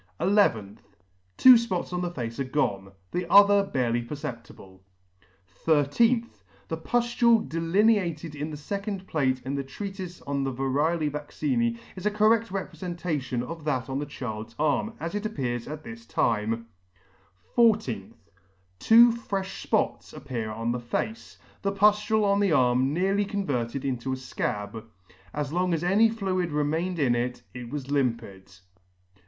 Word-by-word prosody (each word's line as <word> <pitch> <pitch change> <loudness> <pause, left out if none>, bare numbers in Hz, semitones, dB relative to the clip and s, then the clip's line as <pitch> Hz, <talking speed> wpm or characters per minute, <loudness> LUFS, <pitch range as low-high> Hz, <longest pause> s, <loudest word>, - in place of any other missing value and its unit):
nth. 115 - +2 0.6
Two 260 - +9
fpots 230 -7 0
on 180 - -1
the 175 - -1
face 120 -6 -5
are - - +1
gone; 100 -8 -1 0.2
the 180 -1 -3
other 200 0 +7
barely 120 -9 0
per 120 +5 -6
ceptible. 115 -9 -9 0.8
13th. 165 - +2 0.3
The 160 - -2
puftule 235 +4 +2
delineated 170 -1 +1
in 150 +1 -4
the 150 - -6
fecond 200 +5 -4
plate 130 -6 0
in 135 - -3
the 140 -1 -2
Treatife 185 +4 -7
on 140 -1 -1
the 135 - -1
Varioisc 145 +5 0
Vaccina?, 235 - -1 0.2
is 190 +2 -3
a - - +4
corred 215 +2 +3
reprefentation 170 -8 -3
of 165 +4 -7
that 130 -4 -1
on 135 - -1
the 145 - -4
child's 115 -4 -6
arm, 155 +9 0
as 165 +2 -4
it 205 0 -2
appears 125 - -3
at 155 +1 -7
this 225 +4 -10
time. 115 +1 0 0.9
14th. 130 - +2 0.7
Two 235 - +7
frefh 195 -4 -5
fpots 215 -7 -1
appear 125 -6 -4
on 115 +2 -2
the 125 - -2
face. 170 - -4 0.2
The 195 - 0
puftule 210 +2 +3
on 200 0 +3
the 200 -3 +2
arm 130 -2 +3
nearly 195 +5 +1
converted 140 - -2
into 130 -1 -2
a - - 0
fcab. 110 -4 -4 0.5
As 150 0 -3
long 180 0 +1
as 165 - -3
any 205 +6 +4
fluid 185 -6 -2
re 150 0 +1
mained 165 +5 -1
in 135 -6 +2
it, 125 +1 -2
it 125 -1 -8
was 140 0 -5
limpid. 115 -8 -2
155 Hz, 150 wpm, -26 LUFS, 125-200 Hz, 0.9 s, Two